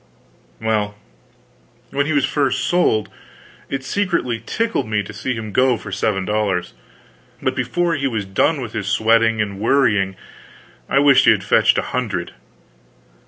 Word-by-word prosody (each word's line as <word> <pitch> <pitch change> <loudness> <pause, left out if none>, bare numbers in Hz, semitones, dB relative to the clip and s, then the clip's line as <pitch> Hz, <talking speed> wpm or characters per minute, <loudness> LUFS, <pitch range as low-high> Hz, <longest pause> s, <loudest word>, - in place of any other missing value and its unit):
Well, 105 -2 -1 1.0
when 140 +1 0
he - - -1
was 145 -2 +3
first 135 -2 0
sold, 175 -12 +1 0.6
it 135 -1 -3
secretly 170 - -1
tickled 230 - -2
me 105 -1 0
to 110 - -10
see 125 +5 -3
him 110 -2 -6
go 125 +2 +3
for 100 - -9
seven 95 0 -1
dollars; 100 -4 -1 0.7
but - - -1
before 175 -1 0
he 140 -3 0
was 110 -6 -3
done 130 +10 +1
with 115 -3 -6
his 100 -3 -4
sweating 115 +1 +3
and 100 -1 -7
worrying 105 -5 +2 0.7
I - - +2
wished 140 -1 +5
he - - +7
had - - +1
fetched - - +3
a - - +1
hundred. - - -2
115 Hz, 155 wpm, -20 LUFS, 105-140 Hz, 1.0 s, he